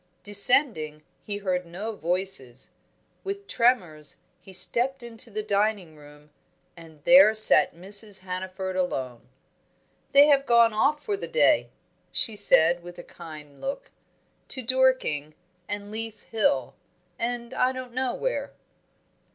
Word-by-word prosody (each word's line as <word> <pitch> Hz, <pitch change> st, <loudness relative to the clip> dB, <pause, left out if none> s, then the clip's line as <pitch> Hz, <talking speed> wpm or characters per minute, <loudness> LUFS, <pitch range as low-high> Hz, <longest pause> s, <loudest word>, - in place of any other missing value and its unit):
Descending, 200 Hz, -, +3 dB, 0.2 s
he 205 Hz, -1 st, -5 dB
heard 185 Hz, -3 st, -3 dB
no 195 Hz, +6 st, -7 dB
voices. 175 Hz, -9 st, -1 dB, 0.5 s
With 400 Hz, +1 st, -6 dB
tremors 180 Hz, -, -1 dB, 0.2 s
he 190 Hz, -, -15 dB
stepped 240 Hz, +8 st, +2 dB
into 235 Hz, 0 st, -7 dB
the 215 Hz, 0 st, -5 dB
dining 205 Hz, -5 st, -2 dB
room, 150 Hz, 0 st, -18 dB, 0.4 s
and 160 Hz, -3 st, -16 dB
there 260 Hz, -, +6 dB
sat 215 Hz, -, +6 dB
Mrs. 200 Hz, +2 st, +2 dB
Hannaford 185 Hz, 0 st, -6 dB
alone. 130 Hz, -10 st, -4 dB, 0.8 s
"They 285 Hz, +1 st, +6 dB
have 280 Hz, -2 st, +2 dB
gone 235 Hz, -1 st, +4 dB
off 295 Hz, +7 st, 0 dB
for 415 Hz, -, -3 dB
the 400 Hz, -, -7 dB
day," 485 Hz, -, +2 dB, 0.4 s
she 220 Hz, -, 0 dB
said, 170 Hz, -3 st, +3 dB
with 175 Hz, 0 st, -12 dB
a 175 Hz, -, -10 dB
kind 150 Hz, -4 st, -13 dB
look. 390 Hz, -, -6 dB, 0.6 s
"To 260 Hz, -, -5 dB
Dorking, 250 Hz, -, 0 dB, 0.3 s
and 205 Hz, 0 st, -6 dB
Leith 220 Hz, -1 st, -7 dB
Hill, 170 Hz, -, 0 dB, 0.5 s
and 235 Hz, +1 st, -4 dB
I 255 Hz, 0 st, +1 dB
don't 255 Hz, -2 st, -9 dB
know 255 Hz, 0 st, -2 dB
where." -, -, -4 dB
205 Hz, 130 wpm, -25 LUFS, 170-245 Hz, 0.8 s, there